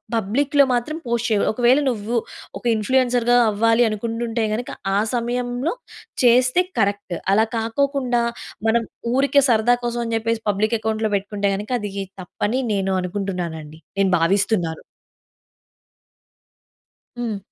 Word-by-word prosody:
పబ్లిక్‌లో 275 +7 +2
మాత్రం 245 +6 -1
పోస్ట్ 235 0 0
చేయాకూడదు. 210 -2 +2
ఒకవేళ 245 +4 +4
నువ్వు 225 -1 -3 0.4
ఒక - - -25
ఇన్‌ఫ్లూయెన్సర్‌గా 245 +1 +2 0.2
అవ్వాలి 230 +3 +3
అనుకుంటుంటే 230 +1 -2
గనుక 235 +3 -3 0.2
ఆహ్, 210 +2 +1
సమయంలో 245 +4 -1 0.5
చేస్తే 250 +7 +4 0.2
కరెక్ట్. 200 -3 0 0.2
అలా 220 +2 +4
కాకోకుండా, 245 +1 0 0.5
మనం 230 +1 +2 0.3
ఊరికే 280 +2 +3
సరదా 235 +1 +4
కోసం 240 0 -2
అని 230 0 -1
చెప్పేసి 225 0 -1
పబ్లిక్ 215 +3 0
అకౌంట్‌లో 220 0 -1
పెట్టుకుంటే 200 0 -1
గనుక 210 +4 -7
అది 205 -1 -5 0.3
తప్పుని 210 +7 -2
నేను 195 -1 0
అనుకుంటున్నానండి, 175 -5 -4 0.2
నేను 195 -1 +3
భావిస్తున్నాను. 180 -1 +1 2.4
హ్మ్. 230 -4 -2
225 Hz, 115 wpm, -21 LUFS, 205-245 Hz, 2.4 s, ఒకవేళ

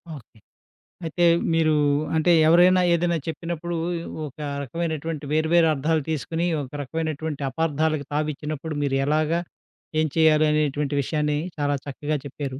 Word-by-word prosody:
Okay. 115 -5 -15 0.7
అయితే 170 +2 -1 0.3
మీరు 160 -1 +3 0.4
అంటే 160 +2 +3 0.2
ఎవరైనా 180 +2 +6
ఏదైనా 170 0 +1
చెప్పినప్పుడు 170 +1 -4 0.5
ఒక 135 - -14 0.3
రకమైనటువంటి 160 0 -4
వేరు 155 +1 +1
వేరు 170 -1 +6
అర్థాలు 155 +3 0
తీసుకొని 160 +2 -2 0.2
ఒక 130 - -8
రకమైనటువంటి 155 0 -4
అపార్థాలకి 155 0 0
తావిచ్చినప్పుడు 150 +1 -3
మీరు 135 -1 0
ఎలాగా, 155 +3 +1 0.6
ఏం 155 - +1
చేయాలి 155 -1 +4
అనేటువంటి 150 -1 0
విషయాన్ని 150 +1 -1 0.2
చాలా 145 0 0
చక్కగా 145 +2 -3
చెప్పారు. 135 -1 -6
155 Hz, 125 wpm, -24 LUFS, 145-165 Hz, 0.7 s, ఎవరైనా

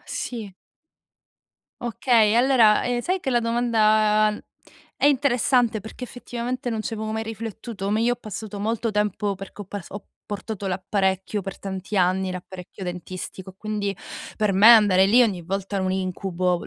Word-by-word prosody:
Sì. 220 -6 -5 1.3
Okay. 230 -2 +3
Allora, 240 -4 +5
e 245 0 0
sai 370 +1 -1
che 265 - -2
la 240 - +3
domanda 215 -2 +3 0.6
è - - +2
interessante 250 -4 +3
perché 220 +4 -11
effettivamente 245 0 -4
non 220 -1 -2
ci 225 - -4
avevo 220 0 -4
mai 220 - -2
riflettuto, 220 -2 -6
ma 215 - +1
io 240 +1 +2
ho - - -19
passato 215 -2 -7
molto 225 +2 -1
tempo 210 -1 -1
perché 195 +2 -10
ho - - -11
passa 195 -1 -8
ho 205 - -7 0.2
portato 205 0 -5
l'apparecchio 190 +1 -1
per 195 0 -7
tanti 190 +1 -5
anni, 185 +1 +2
l'apparecchio 180 +1 -9
dentistico, 185 +1 -7
quindi 205 -2 -3 0.4
per 210 -2 +1
me 195 +3 +5
andare 195 -4 +6
lì 240 +5 +6
ogni 200 -7 0
volta 195 +3 -3
è 195 - 0
un 185 0 0
incubo. 185 -1 -1
210 Hz, 160 wpm, -24 LUFS, 190-230 Hz, 1.3 s, andare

